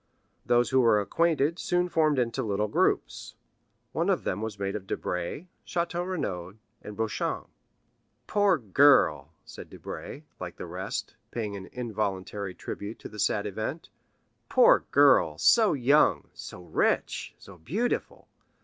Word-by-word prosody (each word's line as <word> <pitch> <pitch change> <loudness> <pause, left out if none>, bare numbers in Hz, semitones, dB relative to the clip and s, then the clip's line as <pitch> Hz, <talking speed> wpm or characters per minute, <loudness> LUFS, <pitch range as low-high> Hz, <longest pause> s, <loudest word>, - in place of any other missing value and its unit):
Those 120 +1 +2
who 130 0 +4
were 115 -3 +4
acquainted 160 - +1
soon 180 0 +1
formed 155 -4 +2
into 125 +1 0
little 105 -2 -1
groups. - - -1 0.6
One - - 0
of - - +1
them 95 - -2
was 110 -2 -4
made 100 0 -3
of 100 -2 -6
Debray, 90 - -3 0.2
Château 175 +1 -2
Renaud, 95 - -4 0.3
and 105 - -9
Beauchamp. 110 -1 -2 0.8
"Poor 205 -4 +3
girl," 105 - +4
said - - -11
Debray, 150 - -8 0.2
like 90 -1 -6
the - - -7
rest, 100 +6 -5
paying 110 -4 -4
an 95 -1 -8
involuntary 100 -4 -4
tribute 105 +3 -6
to - - -10
the 105 - -11
sad 105 0 +1
event,—"poor 155 - 0
girl, - - +5
so 220 -3 +5
young, 140 +2 +3
so 90 - -10
rich, - - -1
so 95 -3 -14
beautiful! 200 - -3
110 Hz, 135 wpm, -27 LUFS, 100-155 Hz, 0.8 s, girl